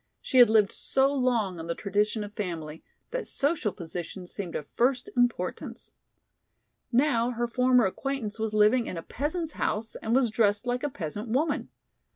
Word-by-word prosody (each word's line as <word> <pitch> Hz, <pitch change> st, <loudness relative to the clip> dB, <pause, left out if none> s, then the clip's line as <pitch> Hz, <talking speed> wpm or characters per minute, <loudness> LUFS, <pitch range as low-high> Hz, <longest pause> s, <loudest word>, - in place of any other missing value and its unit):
She 260 Hz, -, +1 dB
had 245 Hz, -, +9 dB
lived 215 Hz, -3 st, +4 dB
so 270 Hz, +1 st, +1 dB
long 235 Hz, -9 st, +1 dB
on 165 Hz, -, -6 dB
the 170 Hz, -, -2 dB
tradition 210 Hz, +2 st, 0 dB
of 205 Hz, 0 st, -8 dB
family 165 Hz, -6 st, -5 dB, 0.3 s
that -, -, -3 dB
social 280 Hz, -7 st, 0 dB
position 175 Hz, +2 st, -6 dB
seemed 180 Hz, -1 st, -6 dB
of 150 Hz, -, -3 dB
first 250 Hz, +1 st, +1 dB
importance. 245 Hz, -7 st, -1 dB, 1.0 s
Now 240 Hz, -2 st, +3 dB
her 240 Hz, -1 st, -1 dB
former 250 Hz, 0 st, +4 dB
acquaintance 225 Hz, +1 st, -3 dB
was 220 Hz, -1 st, -1 dB
living 215 Hz, +3 st, +4 dB
in 180 Hz, -, -4 dB
a 165 Hz, -, -5 dB
peasant's 315 Hz, +4 st, -3 dB
house 220 Hz, -4 st, -2 dB
and 225 Hz, +2 st, -1 dB
was 255 Hz, -4 st, +3 dB
dressed 210 Hz, 0 st, +2 dB
like 245 Hz, 0 st, -1 dB
a 290 Hz, -, -1 dB
peasant 205 Hz, -, -5 dB
woman. 290 Hz, +5 st, 0 dB
225 Hz, 170 wpm, -28 LUFS, 205-255 Hz, 1.0 s, had